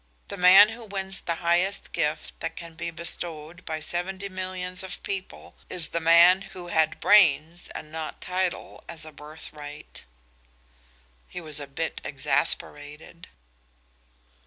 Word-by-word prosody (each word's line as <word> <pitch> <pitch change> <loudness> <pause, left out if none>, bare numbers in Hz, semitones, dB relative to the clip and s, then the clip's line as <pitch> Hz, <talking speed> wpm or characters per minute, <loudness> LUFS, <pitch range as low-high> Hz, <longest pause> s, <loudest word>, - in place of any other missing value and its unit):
The - - -4
man 190 +3 +8
who 225 +1 -8
wins 195 -2 -4
the 170 - -2
highest 180 +4 +1
gift 150 0 -2
that 165 0 -4
can 170 -1 -9
be 165 +1 -4
bestowed 170 0 -4
by 155 -1 -3
seventy 190 +4 -3
millions 185 -1 -3
of 190 - -6
people 195 -1 -5 0.2
is 175 -3 -3
the 170 - -1
man 170 +3 +7
who 190 -2 -10
had 160 -2 +2
brains 170 -4 +4
and 155 - -7
not 160 -1 -6
title 180 0 -3
as 160 -2 -5
a 155 - -9
birthright." 150 - -11 1.2
He - - -7
was 155 -3 -2
a 145 - -6
bit 160 +4 -4
exasperated. 145 +4 -1
170 Hz, 135 wpm, -26 LUFS, 155-185 Hz, 1.2 s, man